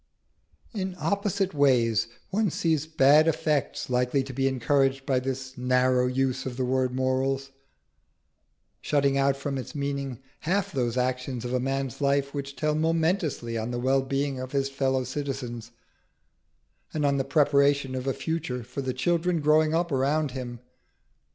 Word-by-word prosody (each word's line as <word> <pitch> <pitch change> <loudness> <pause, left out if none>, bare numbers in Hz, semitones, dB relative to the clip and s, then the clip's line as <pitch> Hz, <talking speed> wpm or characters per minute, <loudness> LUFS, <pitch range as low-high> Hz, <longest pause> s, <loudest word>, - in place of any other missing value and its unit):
In 190 -3 -3
opposite 195 +3 0
ways 125 -7 +3 0.2
one 210 +1 +2
sees 160 -2 0
bad 155 0 +5
effects 155 -3 0
likely 125 +2 +1
to 135 0 -8
be 135 +2 +1
encouraged 135 +1 +1
by 135 -3 +2
this 130 0 -4
narrow 125 0 +3
use 130 0 0
of 125 -1 -6
the 130 - 0
word 130 0 +1
morals, 135 +1 0 1.3
shutting 140 -2 +2
out 140 0 +2
from 140 -1 -3
its 130 - -8
meaning 140 -3 -3 0.2
half 200 +4 0
those 125 -5 -1
actions 125 -1 -1
of 125 - -3
a 125 - +2
man's 135 0 -2
life 140 0 +1
which 140 -1 -5
tell 155 -1 0
momentously 160 - 0
on 110 +2 -3
the 120 - -3
wellbeing 135 +2 0
of 130 +1 -6
his 135 -1 +1
fellow 135 -1 0
citizens, 125 -3 -5 1.3
and 150 -2 +1
on 140 -1 +2
the 135 - +1
preparation 140 -1 +3
of 130 0 -4
a 135 - +1
future 160 -7 -3
for 125 +4 -6
the 130 -1 -2
children 170 +4 +1
growing 155 +1 +3
up 170 0 0
around 140 +2 +1
him. 125 -2 -6
135 Hz, 155 wpm, -27 LUFS, 130-150 Hz, 1.3 s, bad